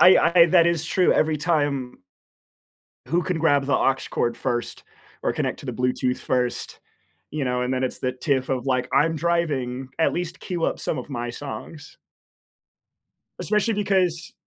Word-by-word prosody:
I 180 Hz, -2 st, +7 dB
I 170 Hz, -, +9 dB
that 170 Hz, 0 st, +5 dB
is 170 Hz, -2 st, +1 dB
true, 180 Hz, +2 st, +3 dB
every 155 Hz, 0 st, +2 dB
time 145 Hz, -5 st, -1 dB, 1.1 s
who 175 Hz, +4 st, +1 dB
can 180 Hz, -3 st, -2 dB
grab 145 Hz, -4 st, +3 dB
the 140 Hz, -, +2 dB
aux 135 Hz, -, +3 dB, 0.2 s
cord 120 Hz, 0 st, 0 dB
first 120 Hz, -2 st, -3 dB, 0.4 s
or -, -, +1 dB
connect -, -, -2 dB
to -, -, -10 dB
the -, -, -3 dB
Bluetooth 125 Hz, 0 st, 0 dB
first, 125 Hz, -1 st, -2 dB, 0.5 s
you 150 Hz, -2 st, -2 dB
know, 125 Hz, -1 st, 0 dB
and 125 Hz, +1 st, -1 dB
then 130 Hz, -, -1 dB
it's 130 Hz, -, -2 dB
the 130 Hz, 0 st, -1 dB
tiff 130 Hz, 0 st, -1 dB
of, 130 Hz, 0 st, -1 dB
like, 125 Hz, -1 st, 0 dB
"I'm 165 Hz, +1 st, +3 dB
driving, 145 Hz, -7 st, -1 dB
at 160 Hz, -, +3 dB
least 175 Hz, 0 st, -4 dB
queue 175 Hz, -3 st, -3 dB
up -, -, -1 dB
some 145 Hz, -, -2 dB
of 125 Hz, -, -6 dB
my 120 Hz, -2 st, -3 dB
songs" 145 Hz, +3 st, -8 dB, 1.4 s
especially 210 Hz, +1 st, +1 dB
because, 185 Hz, -5 st, 0 dB
145 Hz, 170 wpm, -24 LUFS, 125-170 Hz, 1.4 s, I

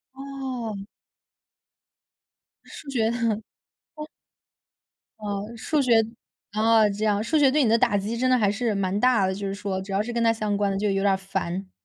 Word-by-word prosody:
哦。 260 Hz, -6 st, -5 dB, 1.8 s
是 300 Hz, -, -12 dB
觉 225 Hz, -4 st, +1 dB
得 235 Hz, -, -2 dB
哦。 215 Hz, 0 st, -1 dB, 1.8 s
哦， 205 Hz, -1 st, -4 dB
数 290 Hz, +6 st, 0 dB
学 250 Hz, -3 st, +3 dB, 0.6 s
啊 220 Hz, 0 st, +4 dB
这 205 Hz, +2 st, -2 dB
样， 210 Hz, 0 st, +1 dB
数 310 Hz, +7 st, +1 dB
学 275 Hz, -3 st, +5 dB
对 295 Hz, -1 st, +3 dB
你 230 Hz, -, +2 dB
的 230 Hz, -, +5 dB
打 205 Hz, -2 st, +2 dB
击 215 Hz, +4 st, -3 dB
真 255 Hz, +1 st, +1 dB
的 255 Hz, -, +4 dB
还 205 Hz, -3 st, +2 dB
是 220 Hz, +1 st, -1 dB
蛮 195 Hz, 0 st, -1 dB
大 245 Hz, -5 st, +3 dB
的， 190 Hz, -, -1 dB
就 200 Hz, +1 st, -4 dB
是 195 Hz, -, -3 dB
说， 200 Hz, -2 st, -3 dB
只 195 Hz, -, -8 dB
要 195 Hz, +1 st, +1 dB
是 240 Hz, -, -4 dB
跟 235 Hz, 0 st, 0 dB
他 230 Hz, -, +5 dB
相 215 Hz, -2 st, -2 dB
关 200 Hz, -1 st, +1 dB
的 195 Hz, -, -2 dB
就 210 Hz, +1 st, 0 dB
有 195 Hz, 0 st, 0 dB
点 200 Hz, -, +4 dB
儿 -, -, 0 dB
烦。 190 Hz, -1 st, -4 dB
215 Hz, 210 characters per minute, -25 LUFS, 200-240 Hz, 1.8 s, 学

